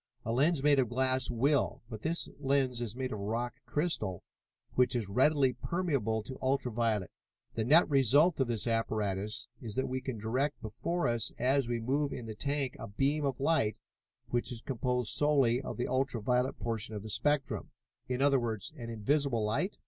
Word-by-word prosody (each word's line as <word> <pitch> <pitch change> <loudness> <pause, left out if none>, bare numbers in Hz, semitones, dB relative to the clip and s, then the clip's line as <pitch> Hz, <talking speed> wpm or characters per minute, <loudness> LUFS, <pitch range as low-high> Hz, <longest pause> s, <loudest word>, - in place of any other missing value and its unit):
"A 115 - -1
lens 140 +4 +2
made 145 -1 +5
of 125 -4 +2
glass 130 0 +1
will, 135 +4 +1
but 110 -2 -8
this 165 +5 -1
lens 135 -3 +1
is 115 -2 -4
made 130 0 -3
of 105 - -4
rock 115 +4 -2
crystal, 145 - -1 0.5
which 125 0 +3
is 115 -5 -1
readily 130 +5 +3
permeable 125 - -1
to 130 +4 -8
ultra 130 -1 0
violet. 110 -5 0 0.4
The 110 - -1
net 155 +8 +6
result 145 +4 +4
of 135 - +2
this 115 -3 0
apparatus 110 -3 -1
is 110 -4 -5
that 130 - 0
we 130 0 -2
can 130 -3 -4
direct 130 +7 -1
before 130 +9 -2
us 120 -2 0
as 130 +1 +2
we 120 -1 -1
move 140 +5 0
in 120 - -6
the 110 - -5
tank 140 +3 -2
a - - -6
beam 140 +9 0
of 135 -2 -1
light 140 -7 +2 0.5
which 120 +1 -1
is 115 -2 -6
composed 125 -2 -1
solely 135 -5 +3
of - - -6
the 120 - -1
ultra 130 -2 0
violet 125 +4 +1
portion 110 -2 -3
of 105 - -5
the 110 - -7
spectrum." 145 +1 0 0.4
"In 125 +1 0
other 140 -1 +4
words, 115 0 -3
an 120 -3 -6
invisible 120 +2 0
light?" 180 - -1
125 Hz, 185 wpm, -31 LUFS, 115-140 Hz, 0.5 s, net